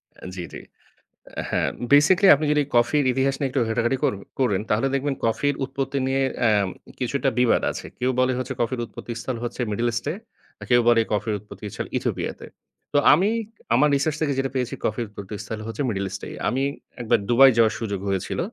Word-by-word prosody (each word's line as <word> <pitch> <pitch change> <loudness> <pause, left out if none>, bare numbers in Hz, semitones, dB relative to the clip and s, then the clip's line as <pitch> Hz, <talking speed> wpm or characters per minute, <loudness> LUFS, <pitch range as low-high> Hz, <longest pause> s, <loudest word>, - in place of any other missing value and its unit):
আ - - -13
জি, 90 - -5
জি। - - -6 0.9
হ্যাঁ, - - +1 0.2
বেসিক্যালি 175 +7 +6
আপনি 155 +2 -2
যদি 150 - +3
কফির 120 +5 +3
ইতিহাস 135 +1 +1
নিয়ে 135 -2 0
একটু 130 0 0
ঘাটাঘাটি 120 +3 0
কর - - +3 0.3
করেন 105 -7 +2
তাহলে 110 +6 +2
দেখবেন 140 0 0
কফির 145 +5 +1
উৎপত্তি 135 0 -3
নিয়ে 135 +1 +1 0.3
আ - - +5 0.5
কিছুটা 135 +2 0
বিবাদ 125 -2 +3
আছে। - - -7
কেউ 125 +1 +1
বলে 130 0 +3
হচ্ছে 130 +1 -3
কফির 120 +1 -1
উৎপত্তিস্থল 120 +2 -6
হচ্ছে 120 - -4
মিডল 115 +3 0
ইস্টে, 145 +6 -2 0.6
কেউ 120 -1 +5
বলে 115 -1 +6
কফির 105 +1 0
উৎপত্তিস্থল 105 0 -7
ইথিওপিয়াতে। - - -3 0.5
তো - - +3 0.2
আমি 185 +8 +3 0.4
আমার 150 - +4
রিসার্চ 150 +2 0
থেকে 145 -2 +1
যেটা 135 -1 -1
পেয়েছি, 125 -2 -1
কফির 115 +2 -1
উৎপত্তিস্থল 105 +1 -7
হচ্ছে 115 +6 -4
মিডল 100 -3 -2
ইস্টে। 95 - -6 0.2
আমি 130 +2 0 0.4
একবার 120 0 +2
দুবাই 135 +3 +8
যাওয়ার 110 -2 +4
সুযোগ 100 -4 -3
হয়েছিল। 95 -2 -2
125 Hz, 175 wpm, -24 LUFS, 115-135 Hz, 0.9 s, দুবাই